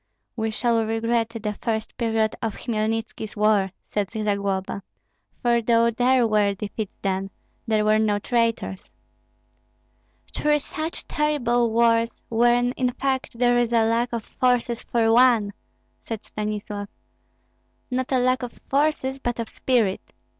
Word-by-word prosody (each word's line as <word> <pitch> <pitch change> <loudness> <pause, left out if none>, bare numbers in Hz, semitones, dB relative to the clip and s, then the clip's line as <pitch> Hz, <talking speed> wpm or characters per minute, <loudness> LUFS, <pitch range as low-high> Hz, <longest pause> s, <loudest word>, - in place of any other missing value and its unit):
"We 225 -1 -1
shall 230 +1 +1
regret 225 +1 0
the 220 -2 -4
first 220 -1 -2
period 225 -2 0
of 225 -3 -2
Hmelnitski's 225 -1 -3
war," 210 -2 +3 0.2
said 205 -2 -2
Zagloba; 200 -3 -2 0.6
"for 235 -1 +3
though 230 0 +3
there 245 +2 +3
were 210 -2 +2
defeats 210 +1 -5
then, 195 0 -1 0.4
there 215 -1 +2
were 215 0 +4
no 210 -2 +2
traitors." 230 -3 -1 1.4
"Three 300 0 +2
such 310 +3 -6
terrible 245 -6 +1
wars, 230 0 +2
when 240 +1 +3
in 250 -1 -1
fact 265 -2 -2
there 245 0 +3
is 240 -1 +1
a 230 -1 +4
lack 230 +2 +1
of 230 -2 -3
forces 245 -2 0
for 225 -1 +1
one," 235 -4 +4 0.5
said 225 -2 -6
Stanislav. 210 -1 -4 1.0
"Not 255 +1 -1
a 260 - +3
lack 255 +1 +2
of 245 -2 -5 0.2
forces, 275 -2 +1
but 240 -2 -3
of 230 - -3
spirit. 230 -7 0
230 Hz, 135 wpm, -24 LUFS, 215-245 Hz, 1.4 s, were